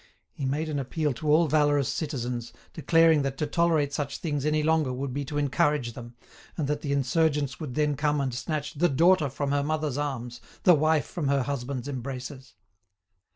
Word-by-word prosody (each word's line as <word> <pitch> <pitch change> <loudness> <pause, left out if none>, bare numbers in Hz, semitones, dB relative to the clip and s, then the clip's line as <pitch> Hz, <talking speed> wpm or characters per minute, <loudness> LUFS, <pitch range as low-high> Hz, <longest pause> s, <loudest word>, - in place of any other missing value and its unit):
He 140 - -4
made 150 +4 -1
an 150 -2 -2
appeal 145 +2 -1
to 150 +5 -4
all 165 +3 +5
valorous 145 -3 +2
citizens, 125 -6 -3 0.2
declaring 165 -1 +4
that 135 -1 -3
to 150 - -1
tolerate 155 -2 +1
such 145 -1 -3
things 145 -3 -2
any 155 0 +1
longer 155 -3 +2
would 130 +1 -4
be 145 +2 -2
to 145 +1 -5
encourage 145 -4 +1
them, 120 0 -10 0.4
and 155 -5 -1
that 150 0 -1
the 145 - -3
insurgents 140 +1 +1
would 150 -7 -6
then 150 -1 +1
come 150 +1 0
and 135 -3 -1
snatch 150 +4 -3
"the 175 +4 +2
daughter 160 +2 +4
from 140 +2 -3
her 145 0 +2
mother's 150 -1 -1
arms, 125 -5 -4 0.2
the 180 - +7
wife 155 -1 +2
from 160 -6 -4
her 140 -1 +2
husband's 135 -1 -4
embraces." 130 -1 -6
145 Hz, 190 wpm, -27 LUFS, 135-155 Hz, 0.4 s, the